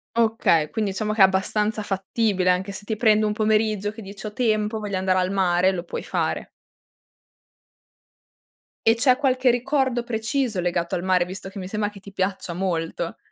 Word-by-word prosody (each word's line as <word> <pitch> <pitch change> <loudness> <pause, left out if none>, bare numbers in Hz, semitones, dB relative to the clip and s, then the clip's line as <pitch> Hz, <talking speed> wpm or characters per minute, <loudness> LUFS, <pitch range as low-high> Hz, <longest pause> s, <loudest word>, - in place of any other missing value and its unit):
Okay, 220 -9 +2
quindi 215 -3 -1
diciamo 215 +2 -2
che 215 - +1
è - - +11
abbastanza 210 +3 0
fattibile, 195 -1 0
anche 185 +2 +1
se 200 +1 -8
ti 220 - -2
prendi 215 -1 +3
un 210 - +1
pomeriggio 215 -1 +1
che 220 +1 -11
dice: 200 +2 -10
"Ho 210 - -8
tempo 215 -2 0
voglio 205 -2 -3
andare 185 0 +1
al 185 +1 0
mare", 185 -1 +3
lo 175 -2 -4
puoi 175 - -5
fare. - - -2 2.4
E 225 - +6
c'è 255 +2 +4
qualche 255 -2 +2
ricordo 260 -1 0
preciso 230 -2 -1
legato 175 -1 -1
al 175 - -3
mare, 185 -2 +2
visto 190 +1 -7
che 195 0 -9
mi 185 - -6
sembra 210 +1 -1
che 205 -1 -13
ti 200 +1 -13
piaccia 190 -2 -2
molto? 170 -2 -3
205 Hz, 180 wpm, -23 LUFS, 185-220 Hz, 2.4 s, è